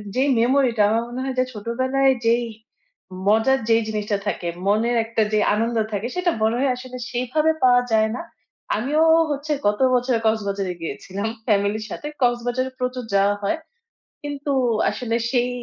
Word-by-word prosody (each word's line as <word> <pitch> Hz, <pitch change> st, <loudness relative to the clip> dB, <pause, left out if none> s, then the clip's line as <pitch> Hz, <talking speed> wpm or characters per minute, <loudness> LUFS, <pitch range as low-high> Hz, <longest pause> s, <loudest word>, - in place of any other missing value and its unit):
যেই 265 Hz, +2 st, +2 dB
মেমোরিটা 245 Hz, -2 st, +2 dB
আমার 225 Hz, +2 st, +1 dB
মনে 245 Hz, +2 st, -6 dB
হয় 265 Hz, -1 st, -3 dB
যে -, -, +4 dB
ছোটবেলায় 260 Hz, +5 st, +1 dB
যেই 235 Hz, +1 st, +3 dB, 0.8 s
মজার 225 Hz, +5 st, +4 dB
যেই 225 Hz, 0 st, +4 dB
জিনিসটা 210 Hz, -1 st, -1 dB
থাকে, 175 Hz, -, -2 dB, 0.2 s
মনের 225 Hz, +4 st, +2 dB
একটা 225 Hz, 0 st, -1 dB
যে 210 Hz, -, +3 dB
আনন্দ 230 Hz, +2 st, 0 dB
থাকে 205 Hz, +3 st, -2 dB
সেটা 360 Hz, -1 st, +1 dB
মনে 220 Hz, +2 st, +2 dB
হয় 275 Hz, 0 st, +2 dB
আসলে 255 Hz, 0 st, -9 dB
সেইভাবে 255 Hz, +6 st, +1 dB
পাওয়া 245 Hz, -1 st, +6 dB
যায় 220 Hz, 0 st, +3 dB
না। -, -, -4 dB, 0.5 s
আমিও 285 Hz, +9 st, +1 dB, 0.3 s
হচ্ছে 290 Hz, +2 st, -3 dB, 0.2 s
গত 210 Hz, 0 st, +1 dB, 0.2 s
বছর 250 Hz, 0 st, +1 dB
কক্সবাজারে 200 Hz, -4 st, 0 dB
গিয়েছিলাম 190 Hz, +7 st, -4 dB, 0.2 s
ফ্যামিলির 210 Hz, 0 st, +1 dB
সাথে। 295 Hz, -, -6 dB
কক্সবাজারে 245 Hz, +1 st, 0 dB
প্রচুর 250 Hz, 0 st, -2 dB
যাওয়া 200 Hz, +1 st, +3 dB
হয় 260 Hz, +11 st, 0 dB, 0.7 s
কিন্তু 290 Hz, 0 st, -4 dB, 0.4 s
আসলে 230 Hz, +2 st, -3 dB, 0.2 s
সেই 245 Hz, -1 st, +1 dB
240 Hz, 155 wpm, -22 LUFS, 215-260 Hz, 0.8 s, পাওয়া